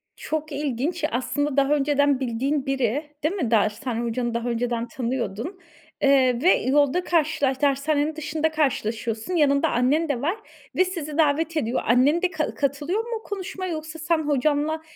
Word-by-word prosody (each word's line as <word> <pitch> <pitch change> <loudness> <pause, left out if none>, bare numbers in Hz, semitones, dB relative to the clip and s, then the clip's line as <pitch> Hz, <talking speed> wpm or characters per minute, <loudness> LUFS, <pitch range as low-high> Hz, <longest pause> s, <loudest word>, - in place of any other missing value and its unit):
Çok 310 0 -4
ilginç. 290 +4 -2
Aslında 285 +3 -1
daha 275 +1 +4
önceden 285 -1 +2
bildiğin 270 +3 -1
biri, 270 +3 -1
değil 335 +6 +1
mi? 250 - -2
Dershane 225 +3 +1
hocanı 235 0 -2
daha 235 +1 -2
önceden 235 0 -1
tanıyordun, 245 - -4 0.4
eee, 260 -3 +4
ve 360 +5 +6
yolda 285 +6 +2
karşılaş 285 -5 +1
dershanenin 290 +2 +1
dışında 315 +1 -1
karşılaşıyorsun. 230 -3 -1
Yanında 280 -3 +3
annen 290 +6 +1
de 255 -3 -1
var 340 +8 0 0.4
ve 370 - +4
sizi 320 -5 -5
davet 320 +1 +2
ediyor. 235 -3 0
Annen 265 +8 +4
de 370 0 +1
ka 310 -1 -2
katılıyor 290 +8 -1
mu 460 -1 -5
konuşmaya 375 -2 -5
yoksa 315 0 -6
sen 330 0 +1
hocanla 300 +2 +1
285 Hz, 150 wpm, -24 LUFS, 255-315 Hz, 0.4 s, ve